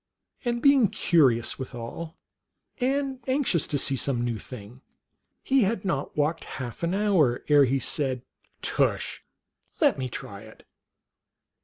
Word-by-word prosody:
And 240 -1 -2
being 280 -5 +6
curious 135 -11 +2
withal, 130 +6 -7 0.6
and 270 +1 0
anxious 260 - +1
to 145 - -1
see 135 0 +1
some 125 -2 0
new 115 -3 -2
thing, 125 +1 -11 0.6
he 270 0 +3
had 200 -1 0
not 150 -7 -2
walked 150 +3 0
half 120 -3 -6
an 170 +2 0
hour 185 -12 +2
ere 145 -1 +7
he 135 +2 +1
said, 130 -1 -1 0.2
" - - -44
Tush! - - 0 0.6
let - - +3
me 130 -1 -2
try 100 -4 -7
it. 110 0 -15
145 Hz, 140 wpm, -26 LUFS, 125-210 Hz, 0.6 s, ere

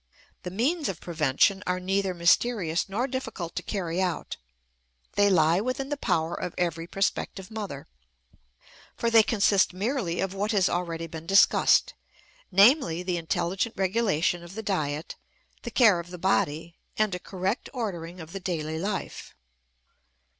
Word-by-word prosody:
The 180 - -5
means 275 - 0
of 185 - -5
prevention 165 +4 +1
are 180 0 0
neither 190 0 -1
mysterious 170 0 +2
nor 220 +6 -1
difficult 230 -10 -5
to - - -2
carry 180 -3 -2
out; 180 -2 -2 0.8
they 205 0 +4
lie 170 0 +4
within 255 +3 -3
the 290 - -1
power 165 - 0
of 180 - -5
every 165 -1 -1
prospective 195 +1 -2
mother, 200 -11 -6 1.1
for 235 - -1
they 225 -1 +8
consist 200 -4 +2
merely 200 -4 -1
of 195 0 -1
what 205 +3 -1
has 195 -3 +3
already 170 -2 -2
been 165 0 -9
discussed, 195 +2 +4 0.6
namely, 195 - +4
the 180 -1 -1
intelligent 175 +6 -1
regulation 190 -4 +1
of 175 +3 -11
the 220 - -5
diet, 155 -6 -2 0.4
the 235 - -5
care 220 -7 +5
of 170 +1 -8
the 180 - -8
body, 170 -2 0 0.2
and 215 -3 +1
a 180 - -3
correct 190 +5 -3
ordering 180 -8 -5
of 160 -1 -9
the 195 - -4
daily 160 -4 -3
life. 195 +2 -4
185 Hz, 150 wpm, -27 LUFS, 170-210 Hz, 1.1 s, they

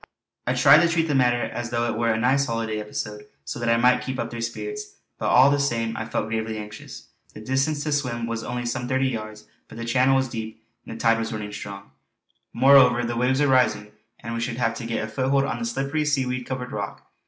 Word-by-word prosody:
I 125 - +1
tried 140 +3 +7
to 170 - +3
treat 165 -1 +1
the 150 - 0
matter 125 -2 +3
as 120 -1 -4
though 120 0 0
it 120 - -1
were 115 +1 0
a 110 - 0
nice 135 +4 +2
holiday 115 -2 -2
episode 105 0 -6 0.2
so - - -5
that 120 0 -1
I 115 - +4
might 125 +2 +4
keep 130 -1 -4
up - - -3
their 115 -1 -5
spirits; 415 - -5 0.2
but - - -1
all 130 +3 +6
the 145 - +2
same 115 -5 -1
I 115 - -4
felt 110 - -2
gravely 110 0 -2
anxious. 105 -1 -9 0.3
The - - -8
distance 135 +6 0
to 150 - -2
swim 125 -5 -1
was 115 0 -4
only 120 0 -4
some 120 +1 -3
thirty 130 +1 +1
yards, 110 -2 -6 0.2
but - - -12
the 115 - -5
channel 130 +3 +3
was 130 0 +2
deep, 110 -2 -7 0.2
and - - -7
the - - -10
tide 115 0 +3
running 105 -2 -5
strong. 100 -4 -8 0.6
Moreover 125 -2 +5
the 120 0 -3
waves 130 +3 +1
were 145 - +4
rising, 110 -6 +2 0.3
and 115 +1 -5
we 115 - -3
should 115 0 -3
have 115 -2 +1
to 115 - -6
get 115 -1 -2
a - - -3
foothold 135 +5 +1
on 130 -3 -3
the 115 - -3
slippery 135 +6 -1
seaweed 130 -4 -1
covered 125 -1 -4
rock. 100 -2 -5
120 Hz, 235 wpm, -24 LUFS, 115-130 Hz, 0.6 s, tried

